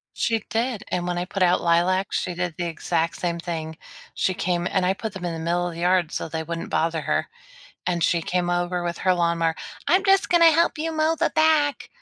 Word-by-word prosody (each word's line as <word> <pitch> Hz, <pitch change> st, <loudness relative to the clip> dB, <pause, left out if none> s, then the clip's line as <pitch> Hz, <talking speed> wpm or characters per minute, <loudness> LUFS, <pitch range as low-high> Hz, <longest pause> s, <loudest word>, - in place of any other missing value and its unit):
She 225 Hz, -1 st, +1 dB
did, 230 Hz, -1 st, -1 dB
and 180 Hz, 0 st, -2 dB
when 175 Hz, -, -1 dB
I 175 Hz, -, -1 dB
put 185 Hz, +1 st, -5 dB
out 180 Hz, 0 st, +4 dB
lilac, 175 Hz, +3 st, +2 dB
she 180 Hz, -, -1 dB
did 175 Hz, -2 st, -3 dB
the 175 Hz, -, -2 dB
exact 165 Hz, 0 st, -1 dB
same 170 Hz, -1 st, -2 dB
thing. 160 Hz, -2 st, -5 dB, 0.4 s
She 185 Hz, -, 0 dB
came 175 Hz, -1 st, -1 dB
and 190 Hz, -2 st, +1 dB
I 190 Hz, -, +2 dB
put 215 Hz, +1 st, -6 dB
them 190 Hz, -, -8 dB
in 175 Hz, -1 st, -2 dB
the 165 Hz, -, -5 dB
middle 175 Hz, +2 st, 0 dB
of -, -, -8 dB
the 165 Hz, -, -8 dB
yard 180 Hz, -2 st, +2 dB
so -, -, -3 dB
they 160 Hz, 0 st, -4 dB
wouldn't 165 Hz, +1 st, -5 dB
bother 165 Hz, 0 st, 0 dB
her, -, -, -1 dB, 0.6 s
and 175 Hz, -2 st, 0 dB
she 170 Hz, -2 st, +2 dB
came 175 Hz, +1 st, -1 dB
over 175 Hz, 0 st, -1 dB
with 170 Hz, -1 st, -3 dB
her 185 Hz, -1 st, +2 dB
lawnmower, 170 Hz, -1 st, +1 dB, 0.3 s
"I'm 370 Hz, +6 st, +3 dB
just 390 Hz, -1 st, +4 dB
gonna 335 Hz, -2 st, +6 dB
help 335 Hz, +1 st, +2 dB
you 320 Hz, +1 st, -2 dB
mow 315 Hz, +1 st, +1 dB
the -, -, +2 dB
back." 310 Hz, -2 st, +2 dB
175 Hz, 230 wpm, -24 LUFS, 170-210 Hz, 0.6 s, gonna